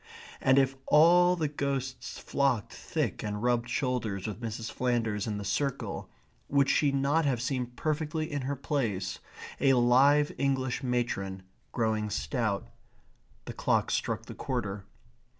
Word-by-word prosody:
and 130 +1 +4
if 135 0 +3
all 175 +4 +6
the 160 -3 0
ghosts 140 -3 -3
flocked 130 -7 0
thick - - -2
and 105 +1 -4
rubbed 120 -1 +1
shoulders 120 -8 -1
with 105 +1 -5
Mrs. 115 0 -4
Flanders 115 -5 -1
in 105 -2 -2
the 100 - -5
circle, 140 +5 -2 0.4
would 140 -1 +3
she 145 -2 +3
not 140 +4 +2
have 130 -4 +1
seemed 125 -1 -2
perfectly 155 +1 -2
in 145 -1 -2
her 140 +2 -2
place, 110 -10 -2 0.4
a 135 -1 +4
live 135 +4 +5
English 130 -2 0
matron, 120 -7 -2 0.3
growing 110 -2 0
stout? 105 - -1 0.8
The - - -6
clock - - +1
struck - - -1
the - - -8
quarter. 100 0 -3
125 Hz, 140 wpm, -29 LUFS, 110-140 Hz, 0.8 s, all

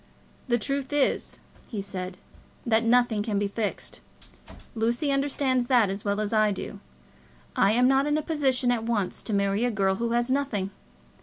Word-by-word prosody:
"The 240 -1 +3
truth 275 +4 -3
is," 290 -2 0 0.3
he 215 - -5
said, 185 -2 -5 0.5
"that 225 -1 +3
nothing 235 -2 +3
can 210 -1 -1
be 205 0 +1
fixed. 210 +1 -3 0.7
Lucy 235 +6 0
understands 275 -2 +1
that 235 -7 +4
as 195 +1 -5
well 205 0 0
as 215 +1 -2
I 215 -1 +4
do. 200 +1 -6 0.8
I 200 +2 +4
am 250 +2 +4
not 270 +2 +3
in 295 0 +2
a 310 - -2
position 270 -6 +1
at 235 -2 0
once 220 -5 -1
to - - -5
marry 200 +1 +1
a 245 - +2
girl 195 -3 +1
who 235 +1 -1
has 240 +1 +1
nothing. 245 -9 -1
230 Hz, 175 wpm, -26 LUFS, 205-260 Hz, 0.8 s, that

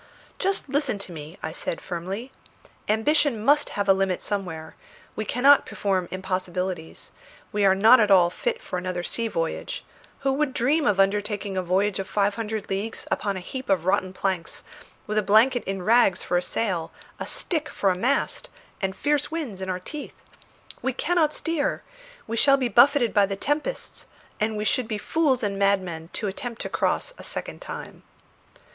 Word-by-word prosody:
"Just 390 -4 -1
listen 280 -5 0
to 200 -2 -4
me," 160 +2 -9
I 160 - -2
said 165 - -3
firmly. 190 +8 -5 0.6
"Ambition 270 +3 +3
must 295 +2 +4
have 205 0 0
a 195 - +7
limit 190 -1 0
somewhere; 180 -6 -4 0.4
we 215 - -3
cannot 275 +6 +5
perform 190 -3 -1
impossibilities; 185 -2 -4 0.4
we 205 -1 +1
are 190 0 +5
not 220 +6 +7
at 210 -2 +3
all 180 -3 +6
fit - - -2
for 180 - -3
another 180 -1 -3
sea 230 +5 0
voyage; 165 -6 -3 0.4
who 270 -1 +1
would 280 -1 0
dream 290 +6 +2
of 200 -2 +2
undertaking 205 0 +1
a 185 - +1
voyage 190 +3 +1
of 190 - -3
five 205 0 +1
hundred 215 -1 -4
leagues 200 +4 -3
upon 200 -2 0
a 180 - -8
heap 260 -3 -6
of 185 -4 +2
rotten 190 -1 +1
planks, 185 -2 -2 0.4
with 215 0 0
a - - +2
blanket 225 +5 +4
in 195 -1 -3
rags 220 -3 +4
for - - -1
a 175 - +3
sail, 180 -4 -2 0.3
a - - -4
stick 315 -4 -1
for 195 - +1
a - - 0
mast, 275 - 0 0.3
and 190 -1 -1
fierce 290 +2 0
winds 290 - -4
in 190 - -4
our 185 -1 -1
teeth? 295 +11 -7 0.7
We 265 - -1
cannot 315 +2 +2
steer; 320 -2 -2 0.4
we 230 +1 -3
shall 275 +3 +5
be 255 -3 0
buffeted 240 0 +5
by 200 -1 +4
the 195 - -3
tempests, 295 - -3 0.3
and 215 0 0
we 210 - -2
should 245 +2 +1
be 215 - -2
fools 270 +1 +1
and 200 -1 -1
madmen 185 -5 0
to 210 - -2
attempt 230 +4 -5
to - - -4
cross - - 0
a - - -9
second - - -5
time." - - -8
205 Hz, 180 wpm, -25 LUFS, 190-260 Hz, 0.7 s, a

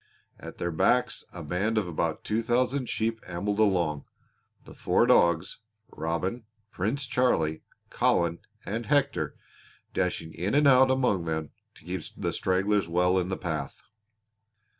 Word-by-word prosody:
At - - -9
their 85 - -2
backs 125 +9 +1
a 85 - -8
band 100 +8 -1
of 105 -4 +1
about 80 -1 -2
two 110 +2 0
thousand 125 +2 0
sheep 115 0 -1
ambled 100 +4 -2
along, 85 -9 +1 0.6
the - - -12
four - - +2
dogs, 85 +5 +3 0.3
Robin, 85 +9 -3 0.3
Prince 115 +10 -1
Charlie, 80 -12 +1 0.3
Colin, 85 -1 +1 0.3
and 115 +3 -4
Hector, 145 -2 +1 0.6
dashing 80 0 -2
in 95 +9 -2
and 145 0 +5
out 130 -1 +6
among 125 -10 +1
them 80 -2 -3 0.2
to - - -18
keep 90 0 -3 0.2
the - - -2
stragglers 95 0 +1
well 90 +2 +2
in 90 0 -2
the 95 - -2
path. 80 -5 -4
95 Hz, 140 wpm, -27 LUFS, 85-115 Hz, 0.6 s, out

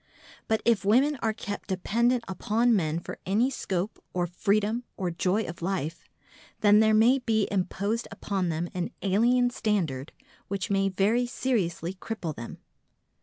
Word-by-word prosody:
But 220 0 0
if 230 -4 +3
women 260 +8 +3
are 220 - +1
kept 205 -2 -6
dependent 235 +6 +1
upon 225 +5 +2
men 160 -4 0
for - - -8
any 220 +8 +2
scope 195 -4 -3
or 180 -1 +1
freedom 205 +6 0
or 180 -2 -1
joy 185 +5 +1
of 170 -3 -7
life, 170 -3 -3 0.6
then 210 0 +6
there 220 0 +5
may 240 +5 +5
be 220 -4 +1
imposed 200 +4 -1
upon 190 -3 -2
them 165 +2 -2
an 180 -1 -2
alien 240 +5 +3
standard 170 - -1 0.4
which 200 +2 -3
may 195 0 +2
very 210 +6 +2
seriously 190 -9 -1
cripple 185 -5 -5
them. 115 - -8
205 Hz, 150 wpm, -27 LUFS, 180-230 Hz, 0.6 s, then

